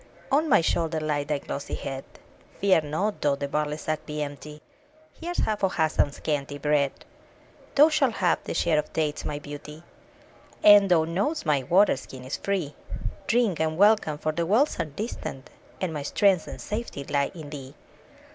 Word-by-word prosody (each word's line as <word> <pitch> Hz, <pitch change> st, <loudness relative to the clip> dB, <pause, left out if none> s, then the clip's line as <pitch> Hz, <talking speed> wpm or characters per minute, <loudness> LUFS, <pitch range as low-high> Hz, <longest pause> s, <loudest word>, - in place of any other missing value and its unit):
On 305 Hz, +3 st, +3 dB
my 245 Hz, -, +6 dB
shoulder 160 Hz, -1 st, 0 dB
lay 150 Hz, -2 st, -1 dB
thy 150 Hz, 0 st, -1 dB
glossy 140 Hz, 0 st, -5 dB
head! 135 Hz, -1 st, -5 dB, 0.6 s
Fear 190 Hz, -4 st, +4 dB
not, 190 Hz, +8 st, -2 dB
though 145 Hz, -1 st, +2 dB
the 140 Hz, 0 st, -4 dB
barley 150 Hz, +1 st, -1 dB
sack 155 Hz, 0 st, -3 dB
be 150 Hz, 0 st, -2 dB
empty, 150 Hz, +1 st, -8 dB, 0.5 s
Here's 350 Hz, +1 st, -6 dB
half 215 Hz, -1 st, 0 dB
of 190 Hz, -, +1 dB
Hassan's 155 Hz, -3 st, +1 dB
scanty 145 Hz, -2 st, -2 dB
bread. 145 Hz, -1 st, 0 dB, 0.7 s
Thou 295 Hz, +3 st, +7 dB
shalt 290 Hz, -6 st, +2 dB
have 180 Hz, -3 st, +1 dB
thy -, -, -4 dB
share 160 Hz, -3 st, +2 dB
of 150 Hz, -, -4 dB
dates, 150 Hz, -2 st, -1 dB
my 150 Hz, -, -3 dB
beauty! 145 Hz, +2 st, -9 dB, 0.8 s
And 205 Hz, -1 st, +8 dB
thou 170 Hz, -3 st, +5 dB
know'st 195 Hz, -, -1 dB
my 150 Hz, -3 st, +2 dB
water 180 Hz, +4 st, +4 dB
skin 130 Hz, -1 st, -10 dB
is 130 Hz, -, -3 dB
free: 185 Hz, -8 st, -2 dB, 0.5 s
Drink 225 Hz, -7 st, +2 dB
and 160 Hz, 0 st, 0 dB
welcome, 205 Hz, -6 st, +4 dB
for 155 Hz, -, -1 dB
the 170 Hz, +1 st, -2 dB
wells 235 Hz, -, +2 dB
are 165 Hz, -, +1 dB
distant, 150 Hz, -, -6 dB, 0.3 s
And 180 Hz, -4 st, -2 dB
my 150 Hz, -, -3 dB
strength 185 Hz, +4 st, +2 dB
and -, -, -7 dB
safety 210 Hz, -9 st, -5 dB
lie 140 Hz, 0 st, 0 dB
in 155 Hz, -4 st, -9 dB
thee. 135 Hz, -2 st, -8 dB
155 Hz, 175 wpm, -26 LUFS, 145-200 Hz, 0.8 s, And